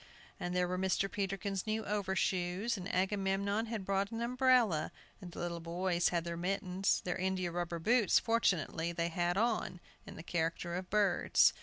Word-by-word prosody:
And 175 0 -3
there 180 0 +2
were 180 +1 -2
Mr. 190 +1 +1
Peterkin's 195 -1 -2
new 220 +1 -1
overshoes, 190 +1 0
and 185 -2 -5
Agamemnon 195 +3 0
had 220 -4 -4
brought 195 +1 0
an 225 0 -5
umbrella, 240 -8 +3 0.3
and 180 -2 -8
the - - -12
little 170 -1 -3
boys 175 +1 0
had 170 -2 0
their 170 0 -4
mittens. 185 +1 0
Their 180 - -2
india 185 -1 -1
rubber 175 0 -3
boots, 220 +4 +3
fortunately, 175 - +1
they 170 0 -1
had 175 +2 0
on, 220 -5 0 0.3
in - - -9
the 165 - -9
character 170 0 -2
of 180 +1 -4
birds. 205 -3 +4
190 Hz, 170 wpm, -34 LUFS, 175-205 Hz, 0.3 s, birds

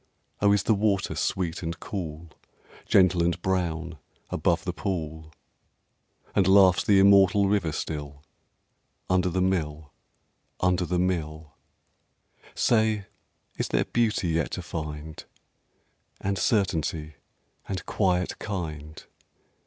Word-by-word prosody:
Oh, 100 0 +5
is 100 -2 +3
the 110 - +3
water 100 -2 0
sweet 90 -3 -2
and 85 -1 -4
cool, 80 -4 -6 0.6
Gentle 90 -2 +4
and 85 +1 0
brown, 85 -4 -2 0.3
above - - 0
the 90 - -2
pool? 80 -3 -4 1.0
And 95 - +3
laughs 95 -1 +6
the 100 - +4
immortal 100 0 +5
river 95 -5 +1
still 75 -2 -5 0.9
Under 90 0 +2
the 90 +1 0
mill, 75 -5 -2 0.7
under 90 0 +1
the 90 - 0
mill? 80 -4 -2 1.0
Say, 110 -3 +2 0.5
is - - -1
there - - +1
Beauty 110 -6 0
yet 80 -1 0
to - - -4
find? 75 -1 -6 1.0
And 100 -1 -2
Certainty? 80 -7 0 0.5
and 95 -2 -4
Quiet 90 -3 0
kind? 80 -6 -6
90 Hz, 115 wpm, -26 LUFS, 80-95 Hz, 1.0 s, laughs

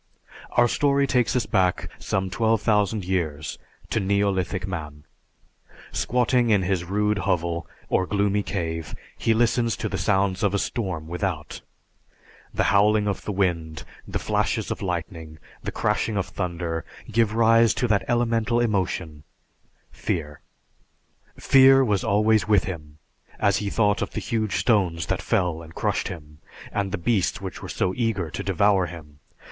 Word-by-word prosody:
_) - - -31 0.3
Our 120 0 +6
story 140 +2 +2
takes 125 -3 +1
us 125 -3 +1
back 95 -4 +1
some 95 -1 -2
twelve 110 +1 +1
thousand 105 -2 +1
years 80 -5 -2 0.3
to - - +1
neolithic 95 -2 0
man. 75 -5 -6 0.9
Squatting 125 0 +1
in 105 -3 +3
his 90 -1 0
rude 105 +2 0
hovel 85 -4 -1 0.2
or 95 - +1
gloomy 100 +1 +1
cave, 80 -5 -4 0.2
he 115 - +1
listens 115 -2 +2
to - - -2
the - - -3
sounds 95 -2 +1
of 100 -1 +1
a - - +3
storm 95 -8 -3
without. 85 -3 -4 0.9
The - - 0
howling 105 +1 +4
of 100 - -3
the - - -2
wind, 85 -5 -1 0.2
the - - -2
flashes - - -1
of - - -4
lightning, 85 -3 -4 0.3
and - - -3
crashing 110 -3 0
of 95 - 0
thunder 85 -3 -3 0.3
give 110 -1 +2
rise 115 0 +5
to 125 - 0
that 105 -2 +2
elemental 120 -1 +1
emotion 95 -8 -1 0.7
fear. 75 -4 -4 1.0
Fear 135 0 +6
was 105 -4 +1
always 105 -1 +3
with 105 -4 +4
him, 75 -5 -7 0.4
as 100 - +3
he 105 - -2
thought 105 -1 +1
of - - -3
the - - -2
huge 110 -5 -1
stones 90 - +1
that - - -2
fell 85 -3 0
and 80 0 -13
crushed - - -1
him, 75 -3 -9 0.3
and 100 -1 -2
the 100 - -1
beasts 95 +1 0
which 95 -3 -7
were - - -7
so 90 - -1
eager 105 -9 -1
to - - -4
devour 95 0 +2
him. 75 -3 -11
100 Hz, 155 wpm, -24 LUFS, 85-110 Hz, 1.0 s, Our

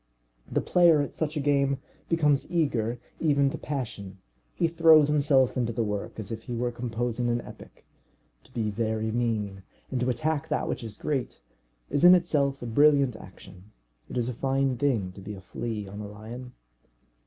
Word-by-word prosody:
The - - +1
player 170 -4 +5
at - - -6
such 155 -1 -2
a - - +1
game 140 -1 +2 0.3
becomes 150 -4 +2
eager, 125 -9 0 0.2
even 140 -3 +2
to - - -5
passion. 110 -9 -5 0.4
He 170 - +2
throws 160 -3 +6
himself 140 -3 +3
into 120 -3 0
the 115 - 0
work 105 0 -4
as 105 -1 -6
if 110 0 -5
he 120 - -4
were 120 +1 -1
composing 120 0 -2
an 120 0 +1
epic. - - -14 0.6
To - - -21
be 115 -4 -2
very 110 0 -1
mean, 110 -4 -1 0.3
and 130 - -1
to 125 +1 0
attack 155 +3 -1
that - - -1
which - - -3
is 110 -2 -7
great, 135 -5 -3 0.5
is 145 - +1
in 180 +1 +10
itself 140 -7 +1
a - - -4
brilliant 140 +1 +4
action. 95 0 -14 0.4
It - - -5
is 120 -1 0
a 125 - -2
fine 135 +1 0
thing 115 -8 0
to 95 - -12
be 105 +2 -7
a - - -10
flea 105 +2 -5
on 100 +2 -8
a 105 - -6
lion. 115 +5 -9
125 Hz, 185 wpm, -27 LUFS, 110-145 Hz, 0.6 s, in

